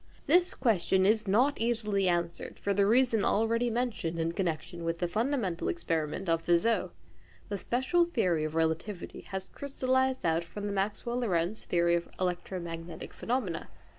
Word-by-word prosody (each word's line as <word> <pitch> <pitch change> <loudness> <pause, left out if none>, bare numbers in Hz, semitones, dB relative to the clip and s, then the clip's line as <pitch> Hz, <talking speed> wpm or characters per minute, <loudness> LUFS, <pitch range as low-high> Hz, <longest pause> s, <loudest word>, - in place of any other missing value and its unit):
This 360 +1 +4
question 190 -6 +2
is 215 +1 +3
not 250 +9 +3
easily 215 -4 +1
answered 170 -1 -2
for 200 - 0
the 200 0 +3
reason 235 -2 +4
already 230 +4 +2
mentioned 225 -8 -2
in 165 0 0
connection 170 -1 -3
with 165 0 -1
the 175 - -1
fundamental 215 -3 -1
experiment 165 - -2
of 165 0 +1
Fizeau. 175 +7 +2 0.6
The 200 -1 -3
special 265 - +2
theory 185 - +1
of 155 +1 -3
relativity 165 +4 -2
has 190 -1 -4
crystallised 260 -2 0
out 165 0 +2
from 205 +5 -7
the 205 - -2
Maxwell 210 +5 -1
Lorentz 185 -3 -1
theory 170 0 +2
of 170 0 0
electromagnetic 175 -2 -4
phenomena. 225 -9 -2
195 Hz, 150 wpm, -30 LUFS, 170-235 Hz, 0.6 s, This